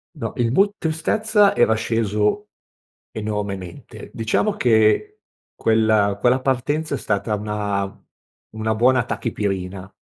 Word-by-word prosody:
No 115 -8 -5
il 115 -1 +1
mood 195 +9 +3
tristezza, 205 +6 +1
era 110 -2 +4
sceso 110 - 0 0.6
enormemente. 100 -4 -6
Diciamo 115 - 0
che 120 - +2 0.4
quella 110 -3 +2
quella 125 +4 +3
partenza 145 +4 -1
è - - -3
stata 105 0 -1
una 100 -2 -3 0.5
una 110 0 -2
buona 125 +2 +3
tachipirina 95 -5 -4
110 Hz, 110 wpm, -21 LUFS, 105-130 Hz, 0.6 s, era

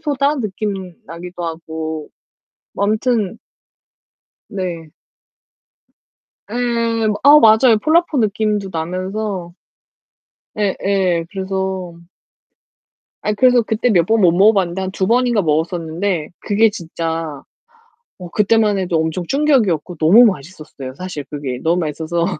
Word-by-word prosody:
소다 290 -1 0
느낌 195 -5 -4
나기도 175 +1 -8
하고 160 -1 -5 0.6
뭐 200 - -1
아무튼 220 -1 0 1.1
네. 175 -6 -5 1.6
네, 220 - -8 0.7
아 290 +2 +8
맞아요. 220 -1 +5
폴라포 325 -1 +2
느낌도 210 -2 0
나면서. 185 +2 -4 1.0
예예. 190 -4 0
그래서 190 -2 -3 1.3
아니 210 0 -1
그래서 250 +1 +4
그때 220 +2 0
몇 175 -6 +4
번 225 +1 +2
못 175 -3 +5
먹어 200 +5 +5
봤는데 190 -2 -1
한 190 - -3
2 190 0 -2
번인가 240 0 +2
먹었었는데 165 +2 -1
그게 220 +2 +3
진짜 165 -4 -5 0.8
어 180 -2 -8
그때만 210 0 +2
해도 180 -3 -1
엄청 160 +2 -1
충격이었고 225 - +1
너무 180 +11 +6
맛있었어요. 155 - -4
사실 180 -4 -6
그게 140 -4 -5
너무 170 +2 +2
맛있어서 160 +2 -2
190 Hz, 245 characters per minute, -18 LUFS, 165-215 Hz, 1.6 s, 아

